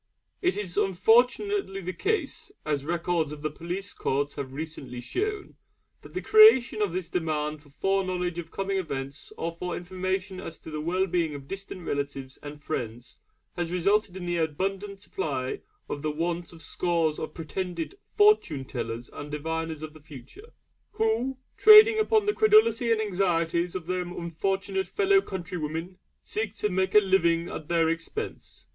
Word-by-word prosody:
It 360 -1 +1
is 185 -4 -4
unfortunately 240 - +3
the 185 +1 -4
case, 380 - -2
as 145 -2 -1
records 170 -1 0
of 150 0 -8
the 155 - -1
police 180 +6 -5
courts 140 +1 -1
have 140 -2 -5
recently 145 -4 -6
shown, 410 - -3 0.4
that - - -14
the - - -2
creation 430 - +7
of 205 -4 +1
this 180 0 -3
demand 155 -3 -2
for 145 - -20
foreknowledge 180 +1 -1
of 165 -1 -7
coming 195 +1 -2
events 140 -5 -5
or 165 0 -3
for 180 -1 -3
information 185 +1 -3
as 165 -3 -7
to 160 - -9
the 155 0 -3
well 180 +4 +1
being 170 -4 0
of 140 -1 -9
distant 195 -1 -7
relatives 140 -3 -4
and 150 +1 -9
friends 120 -5 -5 0.4
has 175 -1 -2
resulted 190 +2 +1
in 180 - -6
the 175 0 -1
abundant 195 +5 -2
supply 135 -11 -3 0.3
of 145 - -4
the 155 - -1
want 170 +2 -2
by 170 - -12
scores 165 -2 0
of 155 - -5
pretended 170 - -4 0.2
'Fortune 415 - +4
tellers' 120 -2 -5
and 145 - -7
diviners 160 +1 -3
of 155 -1 -7
the 155 - -15
Future; 150 - -13 0.4
who, 430 - 0 0.2
trading 435 0 +9
upon 435 -1 +3
the 415 - +2
credulity 430 - +4
and 225 - +3
anxieties 175 -4 0
of 180 -3 -4
their 185 +1 -1
unfortunate 190 +2 -2
fellow 395 - +3
countrywomen, 175 - -5 0.2
seek 215 -1 -3
to 210 - 0
make 190 +1 0
a - - +11
living 170 -4 +2
at 155 - -6
their 165 -1 +3
expense. 165 - -5
175 Hz, 165 wpm, -27 LUFS, 155-195 Hz, 0.4 s, a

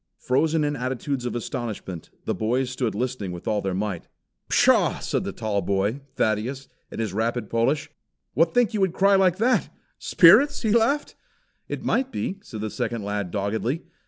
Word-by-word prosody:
Frozen 155 +5 +1
in 145 0 0
attitudes 130 0 -3
of 120 - -4
astonishment, 110 - -5 0.2
the - - 0
boys 125 +4 -1
stood 125 -5 -2
listening 120 -4 -3
with 90 -1 -8
all 105 -2 +1
their 95 -2 -2
might. 100 -3 -3 0.4
"Pshaw!" - - +4
said - - -2
the - - -4
tall 105 -3 -2
boy, 100 +8 -1
Thaddeus, 115 +6 -1 0.2
in - - -8
his 110 -4 -2
rapid 115 +3 -2
Polish. 115 +6 0 0.4
"What 165 +2 +3
think 245 +1 +2
you 215 - -1
would 190 -3 +2
cry 195 +2 +4
like 190 -2 +4
that 245 +4 +2 0.3
spirits?" 225 - +5
He 220 - +1
laughed. 235 +6 +2 0.5
"It - - -5
might 265 0 +1
be," 195 -4 -3
said 110 - -8
the 110 -1 -3
second 115 -3 -3
lad 100 -2 -3
doggedly. 110 - -2
125 Hz, 175 wpm, -24 LUFS, 105-165 Hz, 0.5 s, spirits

